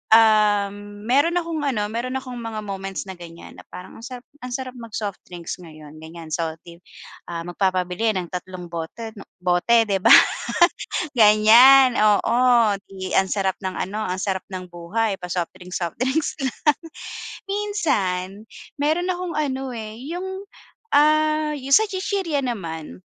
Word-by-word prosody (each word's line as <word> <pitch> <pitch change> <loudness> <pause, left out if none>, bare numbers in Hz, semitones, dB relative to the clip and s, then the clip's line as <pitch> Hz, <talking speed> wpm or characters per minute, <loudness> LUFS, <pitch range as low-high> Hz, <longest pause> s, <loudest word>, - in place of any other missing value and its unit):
Um, 205 -2 +2
meron 285 +9 +2
akong 335 -2 -1
ano, 210 -6 -1
meron 250 +3 -3
akong 255 -2 -5
mga 225 -2 -5
moments 195 -1 -5
na 190 -2 -10
ganiyan 170 -1 -12
na - - -14
parang 180 - -11
ang 230 - -9
sarap, 250 0 -8 0.2
ang 250 -1 -7
sarap 260 -1 -5
mag-soft 210 -3 -5
drinks 175 0 -7
ngayon, 155 -2 -13
ganiyan. 160 0 -10
So 160 0 -2
'di, 170 0 -13 0.5
ah, 170 -1 -5
magpapabili 185 +3 0
ng 180 -2 -4
tatlong 180 -1 -7
bote 170 +7 -6
'no, - - -12 0.2
bote, 185 +6 +4
'di 200 -3 -1
ba, - - +7 1.0
ganiyan, 235 +4 +7
oo. 230 +1 +4
'Di 190 -2 -7
ang 190 -1 +3
sarap 195 -2 0
ng 190 0 -4
ano, 210 +3 -4
ang 185 -3 -3
sarap 190 -2 -2
ng 185 -1 -6
buhay, 195 +5 -1
pa-soft 180 0 -3
drinks 180 -1 -6
soft 170 -2 -3
drinks 270 +5 0
lang. 265 -3 -3 0.9
Minsan, 330 - 0 0.5
meron 315 +5 0
akong 360 -1 -2
ano, 270 -3 -2
eh, 220 -2 -7
yung, 380 +4 -5 0.5
ah 305 +1 +3
yung 275 0 -5
sa 440 - +6
chichirya 375 -6 -2
naman, 160 - -5
215 Hz, 150 wpm, -22 LUFS, 180-265 Hz, 1.0 s, ba